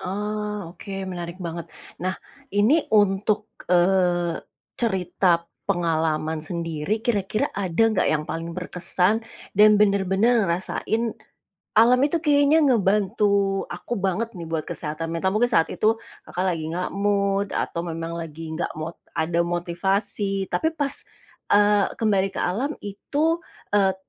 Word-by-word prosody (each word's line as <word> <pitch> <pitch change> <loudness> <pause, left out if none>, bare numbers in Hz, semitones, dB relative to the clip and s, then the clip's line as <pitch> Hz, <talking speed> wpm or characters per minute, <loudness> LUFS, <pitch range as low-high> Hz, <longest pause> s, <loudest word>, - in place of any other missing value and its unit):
Oh, 210 -1 -3
oke 200 - -10 0.2
menarik 175 -1 -5
banget. 170 -1 -5 0.3
Nah, 185 +1 -1 0.4
ini 225 +11 +4
untuk, 210 +1 +2 0.2
eee, 175 -1 +2 0.4
cerita 180 -5 +1 0.2
pengalaman 160 -3 0
sendiri, 165 +4 -2
kira-kira 210 -2 0
ada 190 0 0
nggak - - +2
yang 155 -1 0
paling 165 +1 -4
berkesan, 180 +4 0 0.3
dan 210 +1 +7
benar-benar 200 +3 +3
ngerasain, 220 +6 -1 0.6
alam 235 +3 +6
itu 300 +4 +2
kayaknya 295 0 +4
ngebantu 200 -5 +2
aku 240 - -4
banget 195 +3 -1
nih 170 -1 -6
buat 160 -1 -3
kesehatan 155 +1 -4
mental, 170 +3 0
mungkin 240 +3 +3
saat 165 -8 +2
itu, 220 +1 +2 0.3
Kakak 180 +2 -2
lagi 160 -2 -4
nggak 180 +2 -3
mood 200 0 +1
atau 170 - -1
memang 165 -1 -4
lagi 160 0 -7
nggak 160 - -2
mo 155 +1 -4 0.2
ada 165 +1 0
motivasi 195 +3 0
tapi 320 - +1
pas, 285 -2 0 0.6
eee, 205 0 +5
kembali 195 -3 +2
ke - - -2
alam 250 +12 -1
itu, 295 +11 -1 0.3
e 195 -2 +3
195 Hz, 130 wpm, -24 LUFS, 170-210 Hz, 0.6 s, dan